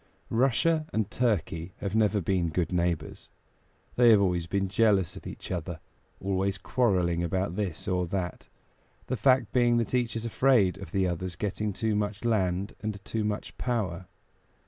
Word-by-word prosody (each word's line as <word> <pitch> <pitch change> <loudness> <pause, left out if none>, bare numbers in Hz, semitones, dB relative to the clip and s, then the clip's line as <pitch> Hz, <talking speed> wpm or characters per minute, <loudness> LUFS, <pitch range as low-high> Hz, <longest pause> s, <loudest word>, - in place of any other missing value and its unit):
Russia 155 +7 +2
and 110 -2 -1
Turkey 95 -7 -1
have 100 -1 -4
never 110 -1 +3
been 90 -1 0
good 85 +2 -1
neighbors. 85 -3 -2 0.7
They 120 -1 +7
have 110 -3 +7
always 90 -4 +1
been 95 +2 0
jealous 100 -2 +2
of - - -9
each - - -8
other, 85 -2 -4 0.4
always 95 0 -1
quarreling 90 -6 +1
about 95 +1 -1
this 95 -6 -3
or 90 -1 0
that, 90 -1 -4 0.6
the 130 - -2
fact 130 0 +3
being 120 -1 +4
that 115 +1 -1
each 120 -3 +1
is 115 0 -3
afraid 115 -6 +3
of 95 -5 -9
the 95 -1 +1
other's 90 +1 -3
getting 105 +3 -2
too 110 +2 -1
much 105 +1 -2
land 95 -3 0
and 110 -3 -4
too 110 -1 -2
much 105 0 -3
power. 95 -8 -2
100 Hz, 165 wpm, -28 LUFS, 90-115 Hz, 0.7 s, They